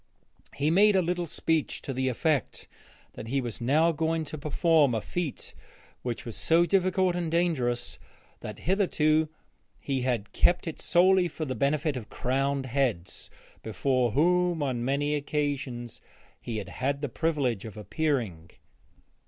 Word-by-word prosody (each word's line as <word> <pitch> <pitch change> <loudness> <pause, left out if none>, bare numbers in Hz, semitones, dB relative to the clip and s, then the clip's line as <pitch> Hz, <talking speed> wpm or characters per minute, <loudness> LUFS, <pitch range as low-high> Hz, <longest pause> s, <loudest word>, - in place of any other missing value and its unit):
He 145 +3 +1
made 205 +4 +5
a 190 - +4
little 175 0 -1
speech 160 -1 -1
to 135 - -4
the 130 +1 -1
effect 140 +2 -1 0.5
that 110 - -8
he 135 +4 0
was 120 -3 -5
now 155 +7 +3
going 160 +1 -1
to 155 - -7
perform 150 -3 +3
a - - +1
feat 165 - -5 0.5
which 120 -2 -4
was 115 -3 -5
so 165 - +3
difficult 185 -1 +2
and 175 -2 -2
dangerous 150 -8 0 0.4
that 105 - -7
hitherto 160 -5 +2 0.5
he 135 -2 -2
had 120 -5 -1
kept 175 - +3
it 160 - -5
solely 185 +1 +4
for 160 -1 -5
the 130 - -3
benefit 145 +4 0
of 115 -4 -7
crowned 135 +2 -1
heads, 125 -9 -2 0.3
before 125 +1 0
whom 175 +1 +2
on 125 -4 -1
many 140 +3 0
occasions 140 -5 -3 0.4
he 115 -2 -4
had 105 - -5
had 140 +2 -2
the 145 - -1
privilege 140 - -1
of 110 -1 -9
appearing. 105 - -2
145 Hz, 150 wpm, -28 LUFS, 125-165 Hz, 0.5 s, made